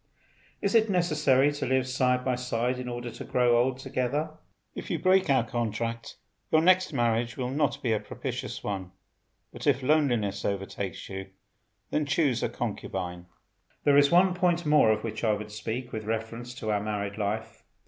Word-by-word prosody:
Is 200 Hz, -, +1 dB
it 225 Hz, -1 st, +4 dB
necessary 150 Hz, -7 st, +3 dB
to 145 Hz, -2 st, -3 dB
live 130 Hz, 0 st, +1 dB
side 125 Hz, 0 st, +1 dB
by 130 Hz, -, +1 dB
side 125 Hz, 0 st, -1 dB
in 125 Hz, -1 st, -5 dB
order 120 Hz, 0 st, -5 dB
to -, -, -8 dB
grow 120 Hz, -1 st, +3 dB
old 130 Hz, +1 st, 0 dB
together? 135 Hz, +4 st, -2 dB, 0.4 s
If -, -, -7 dB
you 170 Hz, -, 0 dB
break 185 Hz, +2 st, +3 dB
our 130 Hz, -3 st, +4 dB
contract 115 Hz, -1 st, -3 dB, 0.3 s
your 155 Hz, -, +5 dB
next 185 Hz, +1 st, +4 dB
marriage 120 Hz, -2 st, 0 dB
will 125 Hz, -1 st, -2 dB
not 145 Hz, +1 st, 0 dB
be 115 Hz, -3 st, +2 dB
a 110 Hz, -, +1 dB
propitious 105 Hz, -, -5 dB
one; 95 Hz, -3 st, -4 dB, 0.6 s
but -, -, -6 dB
if 135 Hz, -2 st, +3 dB
loneliness 125 Hz, -9 st, +1 dB
overtakes 95 Hz, -1 st, -3 dB
you 95 Hz, 0 st, -6 dB, 0.6 s
then 150 Hz, -1 st, 0 dB
choose 140 Hz, -4 st, +1 dB
a -, -, 0 dB
concubine. 90 Hz, -2 st, -4 dB, 0.6 s
There 145 Hz, -1 st, +4 dB
is 145 Hz, 0 st, +6 dB
one 180 Hz, +2 st, +5 dB
point 175 Hz, -2 st, +1 dB
more 150 Hz, -7 st, +5 dB
of 110 Hz, -, 0 dB
which 110 Hz, 0 st, -5 dB
I 110 Hz, -2 st, +3 dB
would 105 Hz, 0 st, -5 dB
speak, 115 Hz, +4 st, -5 dB
with 110 Hz, -1 st, -5 dB
reference 115 Hz, +2 st, -4 dB
to 110 Hz, -4 st, -3 dB
our 105 Hz, -1 st, +1 dB
married 105 Hz, 0 st, -3 dB
life. 105 Hz, +2 st, -3 dB
125 Hz, 180 wpm, -28 LUFS, 110-145 Hz, 0.6 s, is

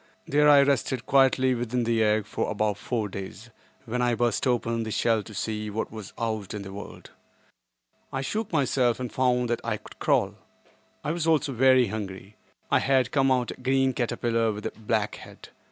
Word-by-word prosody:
There 150 Hz, +1 st, +4 dB
I 140 Hz, -1 st, +8 dB
rested 130 Hz, -3 st, 0 dB
quietly 130 Hz, -1 st, +4 dB
within 120 Hz, 0 st, -1 dB
the 115 Hz, -1 st, +1 dB
egg 105 Hz, -1 st, +2 dB
for -, -, -3 dB
about 105 Hz, -1 st, -1 dB
four 110 Hz, -1 st, -2 dB
days, 100 Hz, +4 st, -8 dB, 0.3 s
when 125 Hz, +1 st, -2 dB
I 120 Hz, -1 st, +2 dB
burst 120 Hz, +3 st, 0 dB
open 115 Hz, -2 st, 0 dB
the 110 Hz, -, -4 dB
shell 110 Hz, 0 st, +1 dB
to 110 Hz, -, -12 dB
see 105 Hz, +1 st, -3 dB
what 110 Hz, +2 st, -3 dB
was 110 Hz, -3 st, -8 dB
out 110 Hz, -3 st, -3 dB
in 100 Hz, -, -5 dB
the 95 Hz, 0 st, -9 dB
world. 100 Hz, +1 st, -10 dB, 1.0 s
I 135 Hz, -, -2 dB
shook 210 Hz, +10 st, -3 dB
myself 130 Hz, -6 st, +1 dB
and 125 Hz, -2 st, -5 dB
found 125 Hz, -1 st, +2 dB
that 120 Hz, -, -1 dB
I 115 Hz, -2 st, -1 dB
could -, -, -16 dB
crawl. -, -, +1 dB, 0.7 s
I 150 Hz, -, -1 dB
was 165 Hz, -1 st, -2 dB
also 155 Hz, -3 st, +2 dB
very 130 Hz, -1 st, +4 dB
hungry. 100 Hz, -1 st, -6 dB, 0.4 s
I -, -, +5 dB
had 130 Hz, -2 st, +2 dB
come 135 Hz, -1 st, +3 dB
out 125 Hz, -2 st, +1 dB
a -, -, -11 dB
green 135 Hz, 0 st, +2 dB
caterpillar 115 Hz, -2 st, 0 dB
with 105 Hz, 0 st, -7 dB
a -, -, -2 dB
black 110 Hz, -1 st, -2 dB
head. -, -, -13 dB
120 Hz, 190 wpm, -26 LUFS, 110-130 Hz, 1.0 s, I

